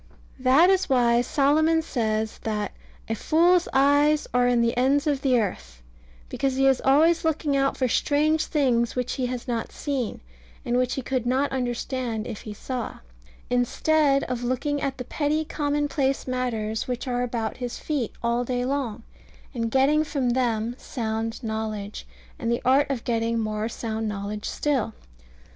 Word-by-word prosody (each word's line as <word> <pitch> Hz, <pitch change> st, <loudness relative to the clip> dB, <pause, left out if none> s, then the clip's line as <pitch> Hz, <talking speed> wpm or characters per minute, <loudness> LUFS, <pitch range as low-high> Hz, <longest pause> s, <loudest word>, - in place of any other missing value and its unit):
That 270 Hz, +8 st, +5 dB
is 380 Hz, -3 st, +1 dB
why 240 Hz, -2 st, +4 dB
Solomon 310 Hz, +5 st, +2 dB
says 220 Hz, -6 st, -1 dB
that 210 Hz, -2 st, -2 dB, 0.4 s
"a 225 Hz, -, -1 dB
fool's 340 Hz, -, +3 dB
eyes 285 Hz, +2 st, +3 dB
are 245 Hz, 0 st, +3 dB
in 245 Hz, -1 st, +3 dB
the 235 Hz, 0 st, +1 dB
ends 275 Hz, +4 st, +2 dB
of 285 Hz, -3 st, 0 dB
the 255 Hz, -3 st, +3 dB
earth," 65 Hz, -, -4 dB, 0.4 s
because 270 Hz, -, -1 dB
he 270 Hz, 0 st, +2 dB
is 270 Hz, -1 st, +4 dB
always 315 Hz, +5 st, +4 dB
looking 315 Hz, -3 st, 0 dB
out 275 Hz, 0 st, +1 dB
for 260 Hz, -, +1 dB
strange 305 Hz, +5 st, +2 dB
things 245 Hz, -6 st, +1 dB
which 250 Hz, -1 st, -1 dB
he 255 Hz, -2 st, -1 dB
has 245 Hz, -1 st, -5 dB
not 235 Hz, -2 st, -2 dB
seen, 270 Hz, -6 st, -3 dB, 0.4 s
and 240 Hz, -, 0 dB
which 250 Hz, 0 st, +1 dB
he 265 Hz, -, -4 dB
could 250 Hz, -2 st, -2 dB
not 265 Hz, +3 st, +1 dB
understand 245 Hz, -2 st, -2 dB
if 225 Hz, -4 st, -6 dB
he 215 Hz, -, -7 dB
saw; 250 Hz, +1 st, -5 dB, 0.5 s
instead 275 Hz, +3 st, +2 dB
of 245 Hz, -1 st, -3 dB
looking 275 Hz, +4 st, -1 dB
at 270 Hz, -1 st, -2 dB
the 250 Hz, -, -6 dB
petty 305 Hz, +3 st, -1 dB
commonplace 290 Hz, -2 st, -1 dB
matters 225 Hz, -4 st, -2 dB
which 250 Hz, +1 st, -3 dB
are 245 Hz, -1 st, 0 dB
about 230 Hz, -3 st, -2 dB
his 245 Hz, -2 st, -4 dB
feet 280 Hz, -8 st, -2 dB
all 235 Hz, +1 st, +1 dB
day 245 Hz, 0 st, -1 dB
long, 250 Hz, -5 st, -2 dB, 0.5 s
and 230 Hz, -3 st, -2 dB
getting 275 Hz, +5 st, +3 dB
from 275 Hz, -5 st, -1 dB
them 235 Hz, -2 st, 0 dB
sound 225 Hz, 0 st, -3 dB
knowledge, 215 Hz, -2 st, -4 dB, 0.3 s
and 230 Hz, -1 st, -1 dB
the 235 Hz, -, -1 dB
art 275 Hz, +3 st, +4 dB
of 265 Hz, -4 st, -2 dB
getting 230 Hz, -1 st, 0 dB
more 215 Hz, 0 st, -2 dB
sound 225 Hz, -1 st, -3 dB
knowledge 210 Hz, 0 st, -4 dB
still. 260 Hz, -7 st, -1 dB
250 Hz, 165 wpm, -25 LUFS, 230-280 Hz, 0.5 s, That